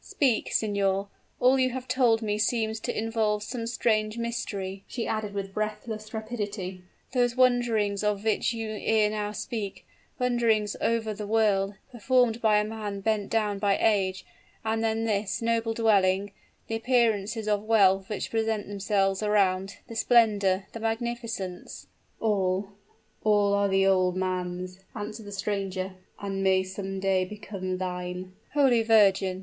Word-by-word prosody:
Speak, 260 -6 0
signor! 200 -2 0 0.3
all 260 +2 +4
you 255 0 +3
have 255 0 -6
told 235 -3 +3
me 210 -1 -1
seems 220 -1 0
to 240 - -4
involve 220 -1 0
some 230 +1 -4
strange 215 -2 0
mystery," 205 -5 -4
she 235 - -4
added 215 -2 -2
with 195 -1 -4
breathless 215 +1 -4
rapidity. 205 -4 -4 0.3
"Those 245 -2 +2
wanderings 235 -5 +2
of 210 -1 0
which 220 +1 +1
you 225 -2 -4
ere 215 -1 +3
now 210 -1 -2
spoke 210 -2 -5 0.3
wanderings 230 -4 +1
over 225 -2 0
the 210 0 -6
world, 205 -2 +2 0.2
performed 240 -1 +2
by 215 -2 +4
a 210 - +3
man 210 -2 -5
bent 210 -1 0
down 210 -3 0
by 200 -1 +2
age; 195 -4 +1 0.4
and 225 0 0
then 225 0 0
this 205 -2 -1
noble 230 -1 0
dwelling 200 -3 +3 0.3
the - - -6
appearances 225 -3 +1
of 210 -1 +1
wealth 195 -3 +3
which 210 - -4
present 220 -2 -1
themselves 195 -1 0
around 195 -2 +1
the 230 - -9
splendor 205 -5 +3
the 230 - -6
magnificence 225 -4 -4 0.2
" - - -40
"All 195 -2 0 0.5
all 205 -1 +3
are 200 0 +3
the 195 0 +3
old 185 -1 +3
man's," 185 0 -3 0.2
answered 210 0 -6
the - - -7
stranger, 195 -2 -3 0.3
"and 195 -1 -3
may 190 0 +3
some 190 +1 -5
day 190 -1 +2
become 185 -1 -5
thine!" 180 0 -5 0.2
"Holy 265 -5 +4
Virgin!" 195 -4 +4
210 Hz, 150 wpm, -27 LUFS, 195-225 Hz, 0.5 s, all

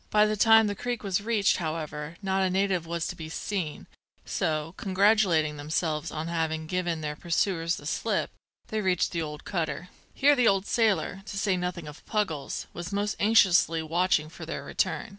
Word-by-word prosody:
By 210 0 +5
the 215 0 0
time 225 +1 +6
the 205 - -1
creek 240 +3 -4
was 195 -1 0
reached, 215 -2 +2
however, 155 -2 -4
not 190 0 +1
a 190 - +2
native 185 -3 0
was 170 0 -2
to - - -4
be 160 -1 -7
seen; 170 -2 -4 0.4
so, 155 +1 -1
congratulating 190 -6 +2
themselves 155 +1 -1
on 155 +1 -4
having 160 -1 -1
given 175 -1 -2
their 150 -1 -3
pursuers 170 +1 0
the - - -10
slip, - - -1 0.4
they 220 -1 -1
reached 185 -3 +1
the 155 -3 -3
cutter. 165 -1 -3 0.3
Here 290 +2 +5
the 250 -3 +3
old 195 0 +3
sailor, 200 -6 +1
to 200 - -5
say 195 -1 +1
nothing 180 -3 -3
of 150 - -11
Puggles, 180 - -2
was 175 +1 -6
most 205 +1 -1
anxiously 190 -6 +4
watching 170 0 +1
for 160 - -11
their - - -5
return. - - -1
180 Hz, 180 wpm, -27 LUFS, 160-200 Hz, 0.4 s, time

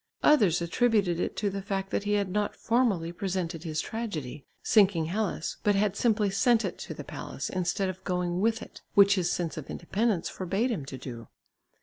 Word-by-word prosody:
Others 205 - +5
attributed 200 -2 +2
it - - -2
to 205 -2 0
the 195 +1 -4
fact 195 0 -3
that 205 - -1
he 205 - +1
had 200 -1 +1
not 205 +1 -1
formally 225 -9 +1
presented 175 -2 -3
his 155 -3 -3
tragedy, 155 - -5 0.2
Sinking 195 -7 +4
Hellas, 190 -1 -2
but 205 -1 +3
had 200 -1 +1
simply 215 -4 +2
sent 235 +3 +3
it - - -4
to - - -6
the - - -7
palace, - - -6
instead 185 +2 0
of 185 0 -6
going 180 -1 -1
with 225 +1 +1
it, - - -13
which 200 0 +7
his 180 -3 +1
sense 165 -4 -2
of 155 - -7
independence 200 +1 -1
forbade 195 +7 -1
him 155 -12 -3
to 135 - -6
do. 120 -4 -8
195 Hz, 195 wpm, -28 LUFS, 170-210 Hz, 0.2 s, which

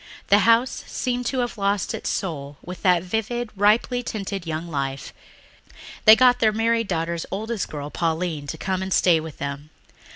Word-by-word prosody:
The 205 - +6
house 235 +3 +3
seemed 245 -1 -2
to 260 0 0
have 240 -3 -4
lost 200 -1 0
its - - -4
soul 145 -6 -4
with 180 -1 -8
that 180 -2 +3
vivid, 225 +4 -2
ripely 215 +5 +2
tinted 200 -6 -5
young 160 +1 -3
life. 140 -3 -4 0.9
They 220 0 +10
got 250 +1 +5
their 220 -1 +4
married 230 +1 +1
daughter's 170 -1 -2
oldest 220 +1 -3
girl, 145 -1 -6
Pauline, 165 -3 -2
to 160 - -5
come 190 +2 -2
and 190 0 -4
stay 175 -3 +4
with 160 -2 -8
them. 140 +1 -5
190 Hz, 170 wpm, -23 LUFS, 160-225 Hz, 0.9 s, They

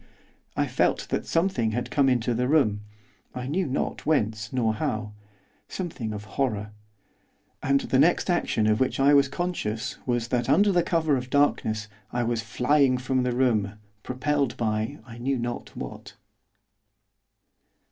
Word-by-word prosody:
I - - +2
felt - - 0
that - - -2
something 165 - +1
had 120 +2 -3
come 140 -2 +3
into 120 -1 +1
the 125 +2 0
room, 125 -9 +3 0.5
I 125 0 -4
knew 170 +7 -1
not 135 - -2
whence 110 -8 0
nor 115 -4 +1
how, 110 -1 -3 0.5
something 155 - -4
of 105 -1 -6
horror. 105 -3 -2 0.9
And 140 +1 +2
the 130 - +1
next 165 +5 +4
action 175 - +1
of 110 0 +3
which 130 +1 0
I 140 +2 +5
was 140 -1 +5
conscious 135 -9 -3
was, 120 -1 0
that 120 -1 0
under 200 0 +4
cover 160 -3 +1
of 125 - -4
the - - -18
darkness, 110 -6 +1 0.2
I 120 0 0
was 115 -1 0
flying 130 +2 +2
from 130 +1 0
the 125 -1 0
room, 110 -6 +2 0.3
propelled 135 +1 -1
by 110 +4 -1
I 120 -1 -11
knew 135 +2 0
not 120 0 -5
what. - - -8
125 Hz, 155 wpm, -26 LUFS, 110-140 Hz, 0.9 s, I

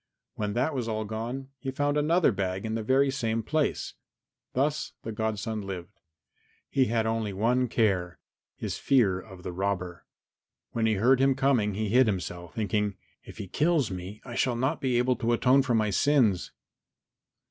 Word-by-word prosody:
When 105 -1 -3
that 125 +7 0
was 125 -4 -2
all 110 -1 -2
gone 120 +5 -5
he 135 - -4
found 145 +2 0
another 155 +2 +3
bag 95 0 -2
in 110 - -2
the 115 - -1
very 135 +5 +3
same 115 -4 -1
place. 155 +5 -1 0.6
Thus 145 +4 0
the 115 - -4
godson 110 0 -2
lived. 95 0 -8 0.7
He 135 -2 +3
had 115 -1 0
only 110 -2 -1
one 120 +6 +2
care 95 -7 0 0.4
his - - -4
fear 105 -9 +3
of 95 -2 -12
the - - -4
robber. 90 -2 -3 0.6
When 115 -1 +1
he 110 - +2
heard 125 +6 +4
him 135 0 +4
coming 120 -8 +2
he 110 0 -1
hid 125 +3 +5
himself, 90 -3 -4
thinking, 105 -1 0 0.3
"If - - -12
he 105 -3 -6
kills 150 - +1
me 95 +3 -7
I 125 - -7
shall 125 0 +1
not 130 +3 -1
be 130 -3 +1
able 125 0 +2
to 115 +1 +1
atone 130 +3 +4
for 125 -3 0
my 110 -2 +2
sins." 115 -6 +3
115 Hz, 175 wpm, -28 LUFS, 100-130 Hz, 0.7 s, hid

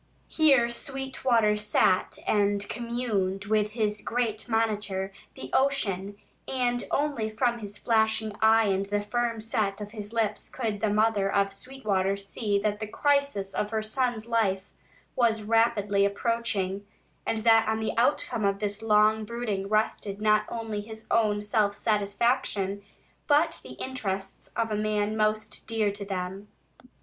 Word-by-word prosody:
Here 275 -7 +4
Sweetwater 255 -3 0
sat 210 -3 +2
and 205 -1 +1
communed 220 -5 -2
with 210 0 +1
his 210 -2 -1
great 230 -2 -2
monitor, 210 -4 0 0.2
the 130 0 -8
ocean, 205 -8 0 0.3
and 245 -2 0
only 280 -7 0
from 235 +2 0
his 205 -1 -5
flashing 220 -2 +1
eye 220 0 +5
and 195 -1 0
the 205 +1 0
firm 230 +2 -1
set 215 -3 -1
of 210 0 -6
his 210 -2 -7
lips 220 -2 -1
could 220 -5 -3
the 220 - +1
mother 210 -2 +2
of 195 0 +1
Sweetwater 200 -5 -1
see 200 +1 -1
that 210 -1 0
the 215 - -4
crisis 280 -6 +1
of 210 - -1
her 220 -1 -1
son's 235 0 -1
life 200 -5 0 0.4
was 225 -3 +2
rapidly 210 -2 +2
approaching, 200 -2 -1 0.4
and 225 - -1
that 225 -1 +5
on 220 0 0
the 220 - -2
outcome 235 -2 +1
of 200 0 +2
this 205 0 -3
long 215 0 +4
brooding 215 -3 -3
rested 210 -1 0
not 215 0 +3
only 225 -3 -4
his 220 +1 -10
own 210 -2 +2
self 210 -1 +1
satisfaction, 205 -1 0 0.5
but 315 +3 +3
the - - -10
interests 195 -7 -4
of 230 -1 0
the 215 - -1
man 210 0 0
most 215 -1 -1
dear 220 -2 +1
to 200 0 -7
them. 190 +1 -4
215 Hz, 145 wpm, -27 LUFS, 205-230 Hz, 0.5 s, eye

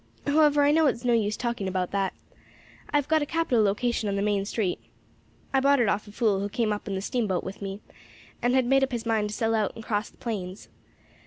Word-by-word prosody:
However, 295 0 +4
I 285 - +5
know 315 0 +4
it's 245 -2 -1
no 240 - +3
use 215 -2 +1
talking 235 -5 -2
about 185 -1 -2
that. 195 -1 -1 0.8
I - - +3
have 290 - 0
got 315 0 +3
a - - 0
capital 325 -9 +1
location 215 +1 0
on 200 - -1
the 200 - 0
main 205 -1 +1
street; 200 -3 -1 0.7
I 270 - +4
bought 280 +1 +4
it 235 - +3
off 205 +1 0
a - - -10
fool 210 -2 +1
who 200 +1 -2
came 220 -1 0
up 210 - -6
in 195 - -2
the 190 - -2
steamboat 205 -4 -1
with 190 +2 -7
me, 195 +1 -5 0.6
and 245 +1 +2
had 260 -1 +3
made 270 +2 +3
up 265 - -1
his 235 -1 -3
mind 220 -2 +1
to 210 - -5
sell 225 -2 0
out 215 -3 0
and 225 - -9
cross 210 0 -1
the - - -26
plains. 200 -5 -5
225 Hz, 245 wpm, -26 LUFS, 200-255 Hz, 0.8 s, I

